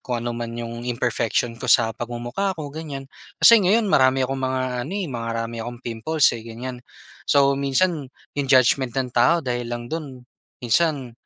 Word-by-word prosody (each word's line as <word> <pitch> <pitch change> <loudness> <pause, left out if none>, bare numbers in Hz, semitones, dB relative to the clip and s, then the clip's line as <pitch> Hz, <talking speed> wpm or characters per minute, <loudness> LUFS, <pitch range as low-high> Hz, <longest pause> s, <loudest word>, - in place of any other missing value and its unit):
kung 120 -2 -3
ano 120 - -2
man 115 0 -5
yung 115 0 -6
imperfection 120 -1 -1
ko 125 - -5
sa 115 -1 +4
pagmumukha 120 - -3
ko, 145 -3 -6
ganyan. 140 -3 -7 0.3
Kasi, 230 -1 +9
ngayon 205 +2 +2
marami 130 0 +4
akong 135 +1 -3
mga 130 0 -1 0.3
ano 175 - -7
eh, 200 - -2
marami 115 -1 -4
akong 120 +1 -7
pimples 120 +7 +2
eh, - - -9
ganyan. 125 +2 -7 0.5
So, 140 -1 +4
minsan 140 +2 +1 0.3
yung 140 - 0
judgement 130 -1 +4
ng 130 -2 -1
tao 165 +8 +3
dahil 120 -1 -2
lang 120 0 -5
do'n 145 -6 -6 0.4
minsan, 135 0 +1
130 Hz, 170 wpm, -23 LUFS, 120-140 Hz, 0.5 s, Kasi